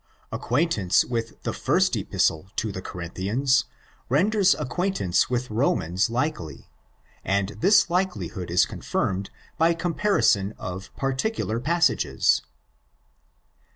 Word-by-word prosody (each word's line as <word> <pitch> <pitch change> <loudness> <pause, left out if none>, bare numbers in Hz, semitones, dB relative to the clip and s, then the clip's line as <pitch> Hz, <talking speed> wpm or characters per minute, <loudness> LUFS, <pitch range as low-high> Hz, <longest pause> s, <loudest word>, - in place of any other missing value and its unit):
Acquaintance 120 - +1
with 115 -2 -4
the - - -2
first - - +1
Epistle 80 +4 0
to 110 - -1
the 95 - -6
Corinthians 100 +10 -1 0.4
renders 190 - +3
acquaintance 150 - 0
with 125 -1 -2
Romans 105 - +1
likely; 120 - -3 0.5
and 100 0 0
this 195 - +5
likelihood 110 - -2
is 85 +2 +4
confirmed 95 +1 -2 0.3
by 165 +1 +4
comparison 165 - +1
of 95 +1 -6
particular 135 - -1
passages. 155 - +2
120 Hz, 100 wpm, -25 LUFS, -, 0.5 s, this